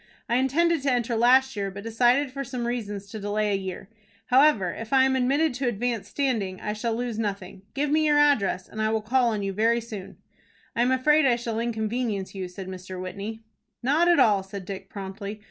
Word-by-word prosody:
I 240 0 +2
intended 315 +5 +2
to 275 0 +1
enter 240 -1 0
last 260 +3 +4
year, 200 -1 -2
but 200 +1 -9
decided 245 +5 +2
for 275 +1 -4
some 245 -2 -4
reasons 210 -5 -3
to 220 - -6
delay 210 +1 -1
a - - +2
year. 190 -1 -5 0.4
However, 255 - +5
if 225 0 -8
I 265 -1 +6
am 265 0 +2
admitted 275 +4 +2
to 255 +1 -2
advanced 235 -1 -2
standing, 220 -10 -1
I 210 - -3
shall 225 +1 -2
lose 235 -2 -3
nothing. 195 -3 -4
Give 285 +1 0
me 310 0 +3
your 295 -1 +4
address, 255 -11 +2
and 215 - -6
I 215 - +2
will 220 -1 -1
call 245 +3 +2
on 210 -3 -2
you 195 0 -2
very 225 +4 +2
soon." 215 -5 -8 0.6
"I 235 - +1
am 245 - +3
afraid 280 +3 +4
I 245 - +4
shall 235 -2 -3
inconvenience 220 -3 -2
you," 190 -2 -4
said 185 +1 -9
Mr. 185 0 -7
Whitney. 200 +4 -6 0.4
"Not 300 +7 +3
at 345 -1 +5
all," 205 -3 +4
said 195 0 -8
Dick, 195 0 -7
promptly. 200 +1 -7
230 Hz, 215 wpm, -26 LUFS, 200-260 Hz, 0.6 s, I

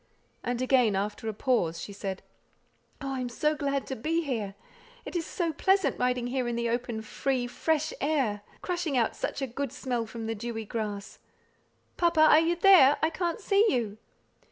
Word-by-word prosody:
And 245 +1 -1
again, 250 -5 +3
after 210 +3 -2
a - - -3
pause 190 -10 +1
she 200 - -7
said, 195 -1 -5 0.8
"Oh, 275 -1 -3
I 265 - -3
am 250 -1 -3
so 300 +6 +1
glad 280 -2 -1
to 265 - -4
be 325 +8 -1
here! 220 -9 -3 0.5
It - - -7
is 335 -2 -1
so 335 -3 -1
pleasant 385 +4 +2
riding 250 -1 +1
here 250 0 -1
in 240 - -1
the 235 0 -1
open, 235 -2 -2
free, 255 +3 -1
fresh 310 +5 -1
air, 270 -9 0 0.2
crushing 345 -6 -1
out 230 - +1
such 275 - -3
a - - +2
good 265 +1 -4
smell 250 -3 -3
from 225 0 -6
the 225 - -1
dewy 225 0 -5
grass. 210 -2 -5 0.8
Papa! 340 -2 +3
are 310 0 +8
you 330 +2 +2
there? 340 -6 +7
I 315 - +3
can't 345 +3 -2
see 400 0 +3
you." 220 -5 -1
255 Hz, 185 wpm, -28 LUFS, 225-310 Hz, 0.8 s, are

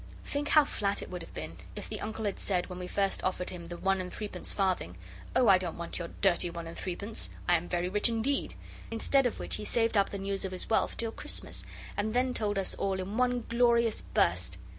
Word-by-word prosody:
Think 290 +1 -2
how 305 -1 +6
flat 200 -6 0
it - - -9
would 180 -1 -4
have - - -10
been - - -6 0.2
if - - -6
the - - -5
Uncle 220 0 -3
had 200 - -1
said, 180 -2 0
when 180 - -5
we 180 - -4
first 195 +1 0
offered 185 -1 -1
him 170 -2 -7
the 175 0 -6
one 195 0 +1
and 180 - -6
threepence 210 -1 -4
farthing, 185 - 0 0.4
'Oh, 250 - +5
I 190 -2 +8
don't 175 -3 -4
want 170 +1 -3
your 170 - -3
dirty 175 -3 +4
one 170 0 -6
and 165 - -7
three 180 -2 -3
pence! 205 +4 -3 0.2
I'm 175 0 +3
very 175 0 0
rich 205 +5 +3
indeed.' 235 +5 0 0.3
Instead 250 +4 +3
of 240 - -4
which - - -2
he - - -6
saved 225 +1 +1
up 200 -1 +4
the 200 - -4
news 195 0 -2
of 190 -1 -3
his 185 - -4
wealth - - +2
till 230 -1 -1
Christmas, - - -2 0.3
and 215 +2 -1
then 250 0 +2
told 210 -3 +1
us 195 - -1
all 195 -1 0
in 195 +4 -3
one 245 -1 +2
glorious 235 -1 +3
burst. - - +1
200 Hz, 235 wpm, -31 LUFS, 180-225 Hz, 0.4 s, I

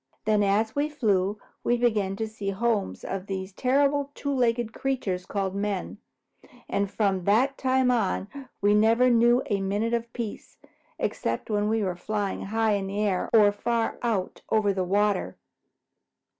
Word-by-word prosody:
Then 215 -1 +3
as 205 +2 +1
we 290 +1 +1
flew, 210 -8 +1 0.3
we 240 - +2
began 215 -5 +1
to 220 +2 -3
see 210 -2 -5
the 195 - -4
homes 225 -3 -1
of 195 0 -5
these 190 0 -4
terrible 280 +4 +1
two 285 -1 -2
legged 240 -3 +1
creatures 195 -9 -2
called 195 -2 -2
men, 200 -1 -3 0.7
and 200 -1 -1
from 195 -3 0
that 250 +7 +3
time 260 -1 +2
on 205 -5 0 0.3
we 205 +1 +4
never 225 +4 +4
knew 240 +1 +4
a 200 -2 -1
minute 205 +4 -1
of 235 0 -2
peace, 230 -4 -6 0.4
excepting 115 - -2
when 205 0 +1
we 220 -1 +1
were 185 -2 -1
flying 205 +2 -3
high 220 +2 +1
in 200 -2 0
the 200 +2 -3
air 200 -3 0
or 210 -2 +6
far 230 +2 -1
out 215 -6 -2
over 210 -2 +2
the 190 -1 -1
water. 200 +1 0
210 Hz, 165 wpm, -26 LUFS, 195-235 Hz, 0.7 s, or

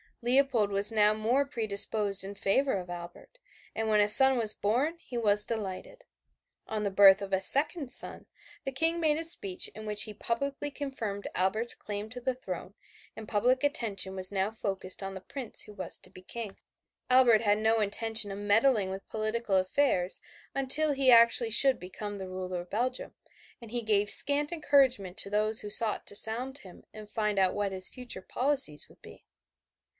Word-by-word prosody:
Leopold 245 -4 +1
was 200 +2 +4
now 210 -1 +2
more 240 +6 0
predisposed 210 -5 +2
in 195 +1 -8
favor 265 +8 0
of 180 -2 -6
Albert, 175 - -11 0.4
and 225 0 -3
when 215 -1 +2
a 205 - +3
son 265 +4 +7
was 220 -3 +3
born 260 +11 -1
he 250 -7 -9
was 210 -2 +1
delighted. 220 - -7 0.6
On 215 -1 -4
the 200 - -1
birth 195 0 +6
of 195 0 -7
a 190 - +1
second 285 - +1
son, - - -1 0.4
the 270 - -4
King 325 +5 0
made 310 -2 +1
a 325 - -3
speech 200 - +2
in 215 +1 -12
which 210 -1 +4
he 215 - -8
publicly 280 +7 -4
confirmed 230 -9 -6
Albert's 215 +6 +1
claim 205 +1 -7
to 250 +2 -9
the 260 +1 -2
throne, 185 -5 -8 0.4
and 220 - -10
public 250 +6 0
attention 220 -10 -2
was 185 0 -1
now 195 0 -1
focussed 195 -4 -3
on 195 0 -6
the 190 - -8
Prince 260 +3 -3
who 210 - -13
was 185 -4 -4
to - - -10
be 185 - -15
King. 210 +1 -7 0.5
Albert 250 -4 +4
had 205 -2 +1
no 220 +1 +1
intention 220 0 -1
of 195 - -7
meddling 205 0 +1
with 190 +1 -8
political 215 -1 -3
affairs 185 -1 +1 0.4
until 285 +3 +3
he 270 -2 +3
actually 235 0 +4
should 265 +3 +3
become 205 +3 -8
the 190 -1 -8
ruler 185 -1 -5
of 175 - -15
Belgium, 250 +4 -3 0.5
and 235 -3 -13
he 240 +1 -4
gave 210 -1 0
scant 290 +7 +3
encouragement 270 - +1
to 200 - -2
those 215 +1 0
who 210 - -8
sought 215 0 +3
to - - -2
sound 250 +6 +3
him 185 -2 -16
and 215 -1 -12
find 210 -1 -2
out 190 -1 +1
what 205 -1 -2
his 185 -1 -1
future 250 -7 -10
policies 260 - 0
would - - -22
be. - - -15
215 Hz, 185 wpm, -28 LUFS, 200-255 Hz, 0.6 s, son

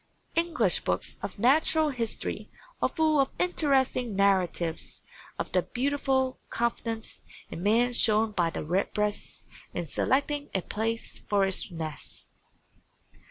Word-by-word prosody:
English 335 0 +2
books - - -2
of - - -5
natural 305 +6 +4
history 240 -5 -3 0.3
are - - +3
full 310 -2 +2
of 270 - +3
interesting 265 - +2
narratives 185 -4 +1 0.3
of - - -3
the - - +3
beautiful 265 0 0
confidence 230 -1 -2 0.3
in 165 - -5
man 230 +5 +3
shown 220 -2 +3
by 175 -5 +1
the - - -4
Redbreast 205 +5 -1 0.3
in 175 - -2
selecting 285 - 0
a 190 - +1
place 225 +2 -2
for 200 -1 +2
its 190 +1 0
nest. 160 -4 -7
230 Hz, 120 wpm, -28 LUFS, 195-270 Hz, 0.3 s, natural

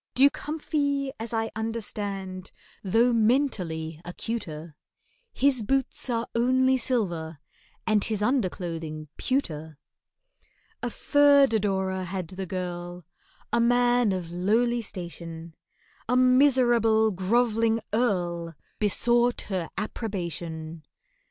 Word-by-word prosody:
DUKE 275 +2 +5
HUMPHY, 285 -3 -1
as 225 0 -5
I 225 -1 -1
understand, 200 -4 -4 0.3
Though 230 +5 +3
mentally 190 - 0
acuter, 170 -4 -5 0.6
His 270 -3 +2
boots 265 +3 0
are 230 -1 0
only 260 +2 +3
silver, 175 - -1 0.5
and 215 -2 +2
His 215 -3 -1
underclothing 170 - -2
pewter. 160 - -2 1.0
A 245 - -2
third 285 0 +4
adorer 190 -3 0
had 180 -2 -4
the 190 0 -6
girl, 175 -1 -5 0.5
A 235 - +3
man 245 -1 +3
of 180 -3 -4
lowly 225 +7 +1
station— 170 -5 -8 0.6
A 250 - +3
miserable 245 -4 +4
grov'ling 225 +4 +2
Earl 175 -8 0 0.2
Besought 240 +3 +3
her 185 -4 -2
approbation. 170 -7 -4
215 Hz, 100 wpm, -26 LUFS, 175-245 Hz, 1.0 s, DUKE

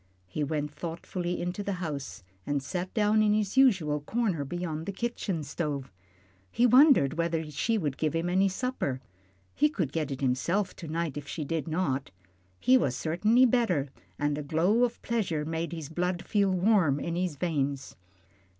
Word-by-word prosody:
He 95 +12 -3
went 150 0 -2
thoughtfully 175 +2 -4
into 180 +3 -3
the 200 0 -2
house 145 - -5 0.2
and 145 +2 -1
sat 180 +5 -4
down 215 0 +3
in 210 -1 +3
his 210 0 -1
usual 190 - +4
corner 195 -3 -1
beyond 160 +1 -4
the - - -1
kitchen 195 -6 -3
stove. 145 - -4 0.6
He 240 - +2
wondered 245 - +6
whether 165 -1 0
she 225 +10 0
would 145 -8 -2
give 155 0 0
him 165 +1 0
any 190 +2 +3
supper. 190 - -2 0.5
He 300 +2 +3
could 170 - -2
get 155 -1 -2
it 135 -2 -4
himself 155 +10 0
to 165 - -8
night 160 -2 -2
if 145 -1 -6
she 155 -1 -4
did 160 +1 -2
not. 140 -5 -1 0.5
He 255 +1 +5
was 130 - 0
certainly 215 - +3
better, 205 - +1 0.3
and 145 0 0
a - - -2
glow 170 +11 +2
of 240 - -5
pleasure 190 -10 -1
made 165 +1 -3
his 160 -4 -5
blood 175 +3 -2
feel 200 -2 +2
warm 185 -6 +3
in 170 +2 -3
his 180 -3 -1
veins. 140 -4 -2
170 Hz, 175 wpm, -28 LUFS, 150-200 Hz, 0.6 s, wondered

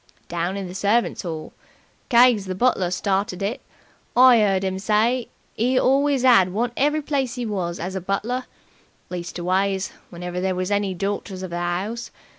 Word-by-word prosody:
"Down 175 +3 -2
in 195 -2 -4
the 180 - -8
servants' 205 +5 +1
'all. 160 -3 -6 0.6
Keggs, 240 -4 +5
the 185 - -3
butler, 190 -4 +2
started 195 0 -1
it. 210 +5 -2 0.6
I 250 -2 +7
'eard 195 -2 +2
'im 190 0 -2
say 225 +5 +1 0.2
he 250 +4 +1
always 275 0 +3
'ad 195 -8 +6
one 230 +5 -1
every 295 +2 +1
place 270 -4 -1
'e 245 - -2
was 180 -5 -2
in 170 - -4
as 185 - -5
a 190 - -3
butler 220 +7 -2 0.7
leastways, 185 +3 -1 0.2
whenever 180 0 -5
there 190 0 0
was 185 +2 -2
any 200 -2 0
dorters 195 0 -3
of 185 - -6
the 175 - -3
'ouse. 185 +7 -3
200 Hz, 170 wpm, -23 LUFS, 185-240 Hz, 0.7 s, I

